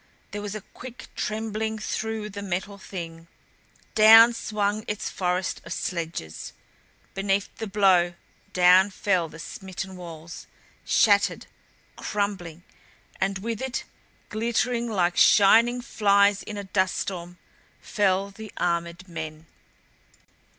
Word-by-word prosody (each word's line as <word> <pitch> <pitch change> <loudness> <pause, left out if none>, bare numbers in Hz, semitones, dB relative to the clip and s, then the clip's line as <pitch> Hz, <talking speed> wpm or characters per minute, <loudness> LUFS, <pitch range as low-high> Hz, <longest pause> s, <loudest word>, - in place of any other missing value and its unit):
There 205 - -5
was 205 0 -5
a 215 - -5
quick 250 -1 -10
trembling 220 0 -2
through 215 0 -3
the 200 +1 -6
Metal 200 +1 -4
Thing. 165 -4 -8 0.7
Down 225 +2 +8
swung 210 -1 -1
its 210 - -3
forest 180 0 -1
of - - -11
sledges. 165 - -4 0.6
Beneath 195 0 -1
the 225 - -4
blow 185 -4 +3 0.4
down 185 +2 +6
fell 185 -4 0
the 155 - -12
smitten 190 +3 -7
walls, 170 -2 -9 0.4
shattered, 200 -3 +3 0.5
crumbling, 190 -5 -3 0.6
and 195 0 0
with 230 0 -3
it 265 -1 -3 0.5
glittering 235 +2 0
like 180 -5 +1
shining 230 +4 +6
flies 200 -3 +3
in 210 - -7
a 205 - -4
dust 190 -1 0
storm 180 -2 -5 0.4
fell 195 -1 0
the 215 +1 -10
armored 170 +1 -2
men. 160 -2 -7
200 Hz, 115 wpm, -25 LUFS, 180-215 Hz, 0.7 s, Down